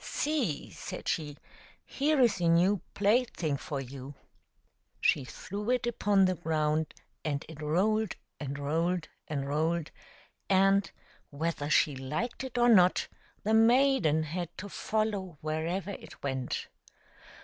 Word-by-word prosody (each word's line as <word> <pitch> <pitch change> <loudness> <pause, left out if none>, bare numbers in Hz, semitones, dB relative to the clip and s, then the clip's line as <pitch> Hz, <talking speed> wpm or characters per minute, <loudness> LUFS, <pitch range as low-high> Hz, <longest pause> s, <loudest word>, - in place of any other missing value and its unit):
" - - -17 0.2
See," 275 - -1
said - - -7
she, 150 -2 -2 0.3
" - - -25
here 295 +1 +1
is 230 -7 +3
a 170 - +2
new 175 +3 +4
plaything 205 - +1
for 140 +1 -4
you." 135 +1 -8 0.8
She 140 - +3
threw 205 - -6
it 250 -2 +2
upon 205 -4 +3
the 185 - +2
ground, 155 -2 0 0.3
and 145 -2 -2
it 155 -1 -10
rolled 200 +7 +1 0.2
and 140 -1 -4
rolled 165 +4 -1 0.2
and 140 -2 -3
rolled, 160 +2 0 0.6
and, 195 +1 +4 0.4
whether 150 0 -2
she 150 -1 +3
liked 150 - -3
it 255 -2 -6
or 240 0 +5
not, 185 -6 +5 0.3
the 220 - +1
maiden 225 - +4
had 170 +2 -4
to 205 - -6
follow 205 -6 -2
wherever 165 +6 -2
it - - -11
went. 130 -2 -2
170 Hz, 140 wpm, -30 LUFS, 150-210 Hz, 0.8 s, or